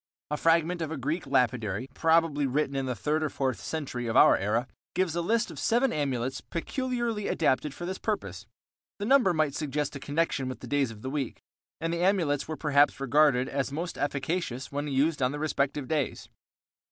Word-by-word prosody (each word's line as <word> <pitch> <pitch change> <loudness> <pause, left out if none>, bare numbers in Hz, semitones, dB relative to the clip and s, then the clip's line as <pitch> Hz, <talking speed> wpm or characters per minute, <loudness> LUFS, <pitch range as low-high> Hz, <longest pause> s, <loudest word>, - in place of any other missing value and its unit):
A 150 - 0
fragment 165 +2 +2
of 160 - -2
a 160 - -3
Greek 150 +6 -2
Lapidary, 125 0 +1
probably 160 -2 +2
written 140 +1 0
in 135 -1 -1
the 125 - -1
third 155 +5 0
or 155 - 0
fourth 130 -4 -1
century 130 -6 -4
of 115 - +1
our - - +8
era, 110 +5 0 0.3
gives 185 -3 +1
a 170 - 0
list 225 +6 +1
of - - -8
seven 240 +3 +2
amulets 130 -3 -1
peculiarly 240 +3 -2
adapted 150 -2 +1
for 175 - -6
this 185 +1 -4
purpose. 105 - -3 0.5
The 205 - -3
number 255 -5 +5
might 155 -4 +1
suggest 150 -1 -2
a - - -5
connection 145 -2 -1
with 130 - -6
the - - -7
days 140 0 +1
of 110 -2 -11
the 130 - -3
week, 140 -4 -3 0.4
and 165 +1 -1
the 170 - -1
amulets 170 -7 +2
were 155 -1 -4
perhaps 145 -2 +3
regarded 135 -1 +3
as 140 0 -2
most 170 +5 -4
efficacious 140 -1 -2
when 145 +1 -2
used 145 +2 +1
on 125 +2 +2
the - - -3
respective 145 -2 -1
days. 150 -4 -2
145 Hz, 195 wpm, -28 LUFS, 135-165 Hz, 0.5 s, our